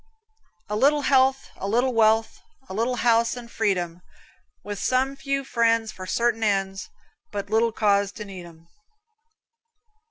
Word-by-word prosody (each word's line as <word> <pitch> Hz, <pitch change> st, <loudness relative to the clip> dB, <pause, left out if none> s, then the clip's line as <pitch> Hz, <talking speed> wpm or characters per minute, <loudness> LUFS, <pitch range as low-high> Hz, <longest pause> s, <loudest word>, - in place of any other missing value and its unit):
A 210 Hz, -, -3 dB
little 285 Hz, +6 st, +3 dB
health, 265 Hz, 0 st, +2 dB
a 195 Hz, -, -4 dB
little 245 Hz, +5 st, +1 dB
wealth, 225 Hz, 0 st, +2 dB, 0.3 s
A -, -, -8 dB
little 230 Hz, +5 st, 0 dB
house 235 Hz, 0 st, +2 dB
and 235 Hz, -1 st, -10 dB
freedom, 180 Hz, -5 st, -1 dB, 0.6 s
With 205 Hz, -1 st, -6 dB
some 265 Hz, +2 st, +1 dB
few 275 Hz, 0 st, -2 dB
friends 230 Hz, -3 st, +1 dB
for 185 Hz, 0 st, -9 dB
certain 235 Hz, +2 st, 0 dB
ends, 195 Hz, -2 st, -1 dB, 0.4 s
But 200 Hz, 0 st, -5 dB
little 225 Hz, +1 st, +3 dB
cause 200 Hz, -2 st, +1 dB
to 210 Hz, -, -8 dB
need 185 Hz, -3 st, -9 dB
'em. 165 Hz, 0 st, -17 dB
225 Hz, 145 wpm, -24 LUFS, 200-245 Hz, 0.6 s, little